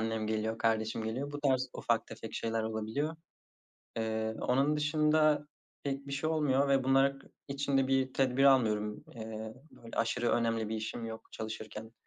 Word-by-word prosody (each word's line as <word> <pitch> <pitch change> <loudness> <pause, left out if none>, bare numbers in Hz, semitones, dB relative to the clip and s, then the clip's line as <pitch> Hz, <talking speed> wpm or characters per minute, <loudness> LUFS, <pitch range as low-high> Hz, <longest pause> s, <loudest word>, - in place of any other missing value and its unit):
annem 110 -1 -1
geliyor, 110 +1 -1
kardeşim 110 0 +1
geliyor. 135 +6 -3
Bu 145 - -5
tarz 130 -2 +2
ufak - - 0
tefek - - -8
şeyler 115 -1 -1
olabiliyor. 110 +8 -2 0.8
Eee, 110 0 -1
onun 140 +4 +2
dışında 150 0 +3 0.4
pek 140 0 -3
bir 140 - -6
şey 150 +3 0
olmuyor 140 -3 +2
ve 135 -1 +3
bunlar 135 +1 +4
k - - -18 0.2
için 140 0 0
de 135 - +3
bir 130 -1 +2
tedbir 135 0 +3
almıyorum. 105 -6 +3
Eee, 110 -1 -6 0.2
böyle 115 - -12
aşırı 120 +1 +1
önemli 115 -2 +1
bir 110 - -2
işim 110 +2 -4
yok. 110 0 -8
Çalışırken 110 0 -6
125 Hz, 165 wpm, -32 LUFS, 110-140 Hz, 0.8 s, bunlar